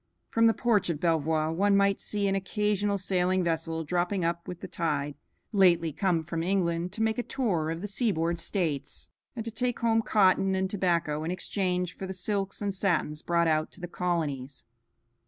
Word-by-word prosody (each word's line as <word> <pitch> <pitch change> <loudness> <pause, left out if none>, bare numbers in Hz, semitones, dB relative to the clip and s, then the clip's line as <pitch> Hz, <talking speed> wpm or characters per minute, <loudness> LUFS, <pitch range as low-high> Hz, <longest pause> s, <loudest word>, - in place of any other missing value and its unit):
From 230 0 +4
the 225 - +3
porch 210 -7 +2
of 160 -4 -1
Belvoir 160 -1 +1
one 200 +4 +3
might 200 0 +2
see 205 -1 -1
an 195 - +1
occasional 205 +1 0
sailing 185 -1 +1
vessel 165 -1 -1
dropping 175 +3 0
up 170 0 -2
with 180 -1 -6
the - - -6
tide, 145 -3 -1 0.4
lately 175 -6 +4
come 175 -3 +1
from 165 0 -3
England 175 -1 0
to 220 - -1
make 220 +1 +1
a - - +3
tour 195 -12 -1
of 165 +1 -3
the 205 - -3
seaboard 175 -6 0
states, 155 -8 -3 0.2
and 225 -2 -4
to 230 - -3
take 245 +2 -1
home 225 -1 +3
cotton 190 -3 +3
and 190 0 -1
tobacco 170 -6 0
in 160 - -3
exchange 180 -1 -1
for 190 - -6
the 190 - -5
silks 195 +2 -2
and 200 -1 -1
satins 170 -5 0
brought 170 -1 +1
out 155 -1 +1
to - - -7
the 175 - -5
colonies. 150 -7 -3
180 Hz, 190 wpm, -28 LUFS, 165-200 Hz, 0.4 s, From